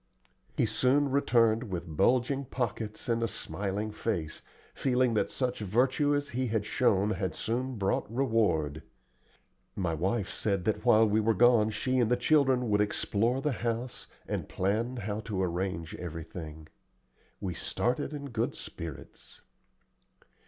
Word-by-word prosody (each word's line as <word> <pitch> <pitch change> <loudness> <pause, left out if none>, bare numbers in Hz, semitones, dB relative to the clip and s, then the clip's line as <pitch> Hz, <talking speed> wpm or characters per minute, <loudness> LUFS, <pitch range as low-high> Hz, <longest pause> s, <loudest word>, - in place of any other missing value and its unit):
He - - +3
soon 130 +6 +2
returned 115 -4 +3
with 85 -3 -5
bulging 130 - +2
pockets 110 -4 -4
and 115 -1 +1
a 115 - +1
smiling 105 0 -3
face, 95 -8 -3 0.3
feeling 125 -2 +2
that 110 - +1
such 125 -2 -2
virtue 130 +8 +2
as 145 0 -2
he 130 -1 -1
had 110 -2 -1
shown 105 -3 +2
had 95 -3 -2
soon 125 +3 -2
brought 100 0 -1
reward. 110 - +1 0.9
My 90 -4 -1
wife 95 +5 -1
said 100 -4 -1
that 105 -1 0
while 115 -2 +6
we 105 +1 +2
were 110 0 +2
gone 120 -1 +5
she 130 +4 0
and 120 -3 +3
the 125 - +3
children 130 -2 +3
would 105 0 +4
explore 110 +4 0
the 150 - 0
house 120 +1 -3 0.2
and - - -3
plan 110 +7 -1
how 105 -1 -3
to 105 -4 -2
arrange 85 -2 -2
everything. 80 -2 -7 0.7
We 90 -2 -3
started 125 - -1
in 140 -3 -6
good 120 +5 -1
spirits. 85 -4 -9
110 Hz, 145 wpm, -30 LUFS, 100-125 Hz, 0.9 s, while